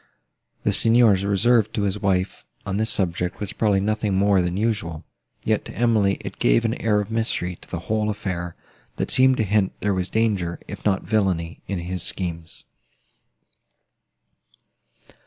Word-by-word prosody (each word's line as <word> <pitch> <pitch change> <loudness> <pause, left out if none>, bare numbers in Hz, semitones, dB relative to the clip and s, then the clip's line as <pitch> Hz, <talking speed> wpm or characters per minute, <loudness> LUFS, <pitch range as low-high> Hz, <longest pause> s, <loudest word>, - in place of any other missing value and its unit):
The - - +2
Signor's 115 -4 +4
reserve 110 +2 +3
to 105 - -1
his 100 +1 -1
wife, 95 -2 0 0.2
on 95 0 -2
this 110 +1 0
subject, 90 -2 -1
was 105 0 -4
probably 105 -3 +2
nothing 105 0 0
more 100 0 +4
than 90 +1 -1
usual; 100 -8 -2 0.4
yet, - - +1
to - - -9
Emily, 110 -4 +2
it - - -8
gave - - +3
an - - +1
air 105 -1 +2
of 105 +2 -6
mystery 110 -6 -1
to - - -18
the 85 - -4
whole 105 +3 -1
affair, 90 -4 -4 0.4
that - - -2
seemed 130 0 +5
to - - +2
hint 105 -1 +1
there 105 -1 0
was 95 -1 -2
danger, 100 -7 0
if - - -8
not 95 -3 +1
villany, 95 -6 0
in 100 - -2
his 90 +1 -3
schemes. 85 -3 -4
100 Hz, 160 wpm, -23 LUFS, 90-110 Hz, 0.4 s, seemed